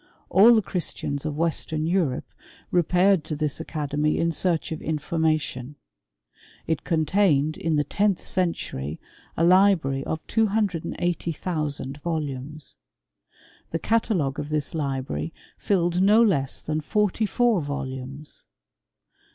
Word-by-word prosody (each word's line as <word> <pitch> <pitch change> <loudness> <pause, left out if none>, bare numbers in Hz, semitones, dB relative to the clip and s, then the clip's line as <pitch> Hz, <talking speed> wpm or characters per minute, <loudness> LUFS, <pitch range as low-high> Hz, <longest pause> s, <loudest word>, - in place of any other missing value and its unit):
All 225 +5 +7
the 220 - +3
Christians 150 -5 -3
of 150 -1 -4
Western 160 -1 +1
Europe 165 -7 0 0.5
re* 175 - +4
paired 180 +1 +3
to 155 - -3
this 150 -1 -1
academy 150 0 -1
in 170 0 +1
search 165 0 0
of 160 - -4
information. 155 -3 -1 0.9
It 160 -2 -1
contained, 155 -2 +2
in 165 -2 -1
the 150 - +2
tenth 200 +5 0
century, 80 - -2 0.4
a 165 - +2
library 175 -7 +4
of 160 - -4
280,000 170 - -1
volumes. 150 - -4 0.9
The 165 - -1
catalogue 185 - 0
of 145 - -4
this 150 -2 -2
library 140 +1 -3 0.2
filled 175 -2 +1
no 210 +4 +6
less 140 - +1
than 155 0 -2
forty 210 +5 0
four 235 -4 +2
volumes. 140 0 -6
160 Hz, 120 wpm, -25 LUFS, 145-185 Hz, 0.9 s, All